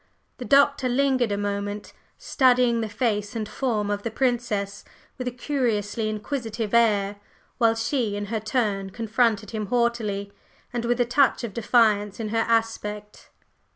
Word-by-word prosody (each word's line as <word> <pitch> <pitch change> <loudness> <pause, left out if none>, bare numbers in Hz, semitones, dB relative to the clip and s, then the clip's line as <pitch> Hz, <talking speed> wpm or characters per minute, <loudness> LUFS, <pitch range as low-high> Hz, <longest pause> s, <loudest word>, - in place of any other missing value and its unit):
The 250 - -5
Doctor 280 -1 +4
lingered 255 -3 +2
a 200 - 0
moment, 205 0 -3 0.2
studying 250 - +3
the 220 - -3
face 210 -1 -1
and 220 -2 -3
form 215 -5 -1
of 205 0 -2
the 230 - -3
Princess 230 -5 -1 0.4
with 250 - -3
a - - -1
curiously 235 -5 -1
inquisitive 225 -1 -4
air; 205 -3 +3 0.4
while 225 -1 +4
she 225 -2 -1
in 205 0 -3
her 220 - +1
turn 210 -3 -1
confronted 225 -1 0
him 215 -2 -3
haughtily, 220 -4 -1 0.4
and 240 -1 -2
with 240 +1 0
a - - +3
touch 260 +2 +2
of 225 -4 -4
defiance 210 -3 +2
in 220 -2 -3
her 225 +1 0
aspect. 210 -2 -2
225 Hz, 155 wpm, -25 LUFS, 205-245 Hz, 0.4 s, Doctor